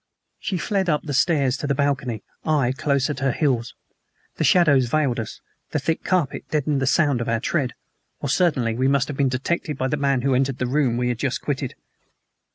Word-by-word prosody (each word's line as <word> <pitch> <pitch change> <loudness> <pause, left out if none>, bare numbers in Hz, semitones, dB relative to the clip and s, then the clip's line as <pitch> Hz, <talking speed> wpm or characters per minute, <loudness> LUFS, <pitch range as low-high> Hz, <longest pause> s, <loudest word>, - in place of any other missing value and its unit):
She 190 - -2
fled 190 0 0
up 150 -2 +1
the 145 - -4
stairs 140 -3 +2
to 145 - -4
the 140 - +1
balcony, 135 -5 -1 0.2
I 145 -6 +2
close 140 -1 0
at 140 - -5
her 135 -1 +1
heels. 125 -4 0 0.6
The - - 0
shadows 145 -5 +4
veiled 135 -2 +1
us, 110 -1 -6 0.3
the - - +2
thick 160 +3 -1
carpet 175 -7 -1
deadened 150 -2 0
the 130 - 0
sound 145 -4 +2
of 115 - -2
our 115 -1 +1
tread, 130 +1 -1 0.4
or - - -3
certainly 135 -7 +2
we 130 +3 +1
must 140 -1 +2
have 145 - -5
been 140 -2 +2
detected 150 +4 -2
by 130 0 -1
the 150 - 0
man 140 -3 +1
who 135 -1 +2
entered 135 0 +1
the 125 - -1
room 130 -2 +1
we 125 0 0
had 120 -1 -2
just 135 -1 -1
quitted. 135 -3 -3
140 Hz, 210 wpm, -23 LUFS, 125-150 Hz, 0.6 s, shadows